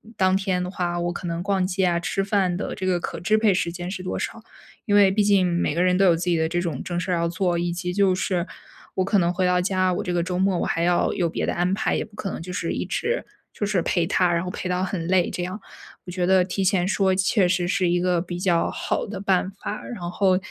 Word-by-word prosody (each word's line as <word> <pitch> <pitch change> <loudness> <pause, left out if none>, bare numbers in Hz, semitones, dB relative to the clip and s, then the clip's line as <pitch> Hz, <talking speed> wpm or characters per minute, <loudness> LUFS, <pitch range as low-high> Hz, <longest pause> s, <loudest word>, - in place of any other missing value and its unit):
当 185 0 +3
天 185 -2 -1
的 180 - -4
话 175 -3 -2
我 175 0 -1
可 175 - -6
能 170 0 -3
逛 195 -1 +1
街 190 0 0
啊， 170 -1 +2
吃 195 +2 -1
饭 195 -3 +1
的 - - -4
这 190 - -5
个 180 -2 +1
可 - - -4
支 215 +5 +2
配 215 -2 +3
时 175 -2 -1
间 175 +1 -6
是 190 - -5
多 185 - -3
少。 225 - -4 0.4
因 205 - +2
为 200 -2 +6
毕 210 +1 +2
竟 200 -2 +4
每 170 -4 0
个 175 - +2
人 180 0 +3
都 195 - +4
有 175 -3 +5
自 165 - -4
己 170 - +2
的 160 - +1
这 175 +2 -1
种 165 -7 -3
正 175 -1 -3
事 180 - -3
儿 - - +2
要 170 0 0
做。 175 +1 0
以 170 0 -1
及 180 +1 -3
就 195 -1 +3
是 180 -2 -1 0.5
我 185 - +1
可 205 +2 +2
能 175 -2 +2
回 185 +1 0
到 180 0 +3
家， 185 0 +1
我 - - -2
这 180 - -2
个 175 -1 +1
周 180 0 -2
末 190 -1 +2
我 - - 0
还 165 - -1
要 175 0 +2
有 175 -4 0
别 - - -2
的 - - -1
安 180 +2 0
排， 220 +2 0
也 - - -1
不 210 - -19
可 195 - -4
能 - - -6
就 180 +2 -7
是 180 - -2
一 - - -2
直 475 +2 -2 0.3
就 205 - -2
是 200 -3 +1
陪 175 0 +1
他， 180 0 +2
然 170 +1 0
后 180 - -4
陪 185 - -5
到 180 0 0
很 180 -3 -3
累， 180 -1 +3
这 180 - -4
样。 185 +4 -5 0.5
我 180 - -7
觉 180 0 -1
得 190 0 +4
提 190 +1 -2
前 180 -1 +2
说， 190 -1 +2
确实 185 -2 +2
是 180 0 +1
一 175 0 +2
个 180 -1 +2
比 175 0 -5
较 175 -2 +2
好 - - -2
的 195 -2 -6
办 190 -1 +1
法。 200 +2 -6
然 235 -7 -7
后 190 -2 +3
180 Hz, 305 characters per minute, -24 LUFS, 175-195 Hz, 0.5 s, 为